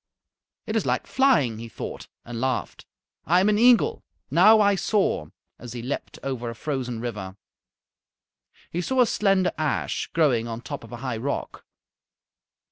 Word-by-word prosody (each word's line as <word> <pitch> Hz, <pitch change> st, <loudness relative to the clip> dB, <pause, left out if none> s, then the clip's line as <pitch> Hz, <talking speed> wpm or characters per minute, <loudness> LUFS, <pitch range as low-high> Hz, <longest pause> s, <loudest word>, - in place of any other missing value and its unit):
"It -, -, -3 dB
is -, -, +2 dB
like -, -, 0 dB
flying," 190 Hz, -, +2 dB
he 115 Hz, 0 st, -8 dB
thought -, -, -7 dB, 0.2 s
and 115 Hz, -1 st, -6 dB
laughed. 130 Hz, -1 st, -2 dB, 0.4 s
"I 175 Hz, +4 st, +5 dB
am 195 Hz, +3 st, +3 dB
an 210 Hz, 0 st, +2 dB
eagle. 250 Hz, -, +4 dB, 0.3 s
Now 220 Hz, +1 st, +7 dB
I 205 Hz, -1 st, +4 dB
soar," 190 Hz, -, 0 dB, 0.3 s
as 120 Hz, 0 st, -8 dB
he 120 Hz, -2 st, -6 dB
leaped 130 Hz, +4 st, -5 dB
over 125 Hz, -3 st, -3 dB
a 115 Hz, -, -7 dB
frozen 130 Hz, -3 st, -3 dB
river. 105 Hz, -5 st, -5 dB, 1.3 s
He 175 Hz, -, -2 dB
saw 260 Hz, +8 st, +1 dB
a -, -, +6 dB
slender 195 Hz, -5 st, +2 dB
ash 155 Hz, -2 st, -1 dB
growing 130 Hz, -8 st, +2 dB
on 115 Hz, 0 st, -5 dB
top -, -, -7 dB
of 115 Hz, -, -13 dB
a 120 Hz, -, -6 dB
high 120 Hz, -3 st, -2 dB
rock. 140 Hz, +5 st, -4 dB
135 Hz, 160 wpm, -25 LUFS, -, 1.3 s, Now